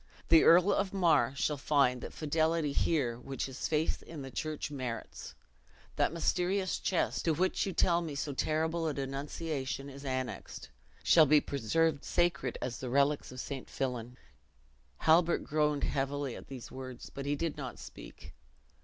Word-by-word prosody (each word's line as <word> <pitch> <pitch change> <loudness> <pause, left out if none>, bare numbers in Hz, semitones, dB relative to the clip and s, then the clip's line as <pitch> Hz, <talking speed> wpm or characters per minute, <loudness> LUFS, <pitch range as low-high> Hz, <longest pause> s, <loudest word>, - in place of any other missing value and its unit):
"The 165 -1 +7
Earl 180 +4 +6
of 195 -1 0
Mar 150 -10 +3
shall 145 +4 0
find 135 -3 +2
that - - -6
fidelity 160 0 0
here 130 -6 0
which 135 +1 -4
his 130 -1 -4
faith 155 0 0
in 155 -4 -8
the 135 - -8
church 155 +3 -4
merits. 125 -5 -6 0.6
That - - +2
mysterious 180 +3 0
chest, 180 - 0
to 160 -2 +2
which 185 +4 +1
you - - -1
tell 170 0 +3
me 160 -4 -5
so 140 +1 -3
terrible 160 +3 0
a 150 - -2
denunciation 140 0 -4
is 140 +1 -10
annexed, 130 -2 -4 0.3
shall 160 -3 +6
be 150 +2 +6
preserved 145 +3 0
sacred 175 -8 0
as 120 - -4
the 130 - -4
relics 140 +2 +2
of 130 - -8
St. 135 -1 -6
Fillan." 125 -2 -3 0.8
Halbert 165 +2 +4
groaned 150 -1 +1
heavily 140 -1 -1
at - - -10
these 130 -3 -9
words, 130 -2 -8
but 140 0 -5
he 145 - +1
did 165 +1 -2
not 130 -4 -6
speak. - - -11
145 Hz, 160 wpm, -32 LUFS, 135-165 Hz, 0.8 s, The